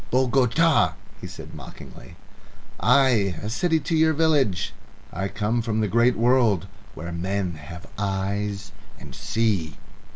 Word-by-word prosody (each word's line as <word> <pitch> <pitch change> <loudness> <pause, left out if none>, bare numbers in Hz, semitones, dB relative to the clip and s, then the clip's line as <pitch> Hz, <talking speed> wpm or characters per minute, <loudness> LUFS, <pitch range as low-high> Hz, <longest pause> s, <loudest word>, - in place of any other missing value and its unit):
"Bogota!" 130 - +3 0.3
he - - -7
said - - -10
mockingly. - - -12 0.6
"Ay! 125 -8 +3
A 105 - -3
city 160 +6 +1
to 165 - -1
your 160 0 +4
village. 145 - +1 0.4
I 95 - -2
come 105 +4 -1
from 110 -1 -1
the 110 - +1
great 115 +4 +3
world 115 -6 +3 0.3
where 85 +1 -6
men 90 +1 -2
have 80 +3 -10
eyes 100 0 -2 0.3
and 70 - -11
see." 100 - -1
105 Hz, 130 wpm, -24 LUFS, 95-125 Hz, 0.6 s, your